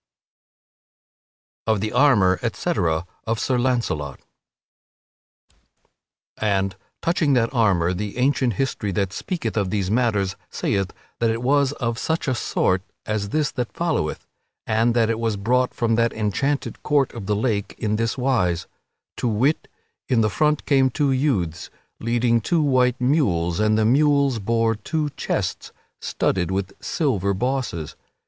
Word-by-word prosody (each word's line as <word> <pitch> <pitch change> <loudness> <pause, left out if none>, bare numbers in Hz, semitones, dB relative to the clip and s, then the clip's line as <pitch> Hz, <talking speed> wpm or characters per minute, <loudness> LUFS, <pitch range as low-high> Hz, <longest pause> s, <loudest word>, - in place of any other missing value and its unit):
[Sidenote: 110 - +4
Of 100 - -3
the 110 0 -2
armor, 100 -11 +4
etc., 80 0 0 0.2
of 115 0 -1
Sir 130 -2 +1
Launcelot] 115 - -1 2.2
And, 95 -3 0 0.3
touching 165 -4 +2
that 120 -1 +2
armor, 95 -8 +2
the 105 +4 -4
ancient 130 -1 +2
history 105 -2 -2
that 95 0 -1
speaketh 140 - -3
of 100 -4 0
these 95 -1 -1
matters 105 -5 +1
saith 95 -1 -1 0.3
that 115 - +2
it 115 +2 -2
was 140 +1 +3
of 115 -4 -2
such 160 -1 -1
a 130 - +2
sort 95 -5 +1 0.2
as 105 -2 -2
this 150 +4 0
that 125 -3 -4
followeth, 165 - -1 0.4
and 115 +2 +2
that 115 -1 +3
it 115 - -2
was 115 -3 0
brought 125 +5 +1
from 115 -1 0
that 115 0 +2
enchanted 135 +7 -1
court 145 -3 +1
of 110 -5 -7
the 105 - +1
lake 105 -2 -1
in 105 0 -1
this 115 +3 -1
wise; 115 -11 +1 0.5
to - - -1
wit, 125 +8 +1 0.4
in 125 -4 +3
the 110 -1 +2
front 150 +5 +1
came 135 -3 +4
two 140 +2 +1
youths, 105 - 0 0.3
leading 115 0 +1
two 165 +7 +1
white 130 -3 +2
mules, 105 - +1
and 110 0 +3
the 110 - +2
mules 140 0 +3
bore 115 +2 +1
two 145 +7 -2
chests - - -3 0.3
studded 90 -3 0
with 95 0 -2
silver 100 - 0
bosses. 125 - -2
115 Hz, 145 wpm, -23 LUFS, 100-130 Hz, 2.2 s, Sidenote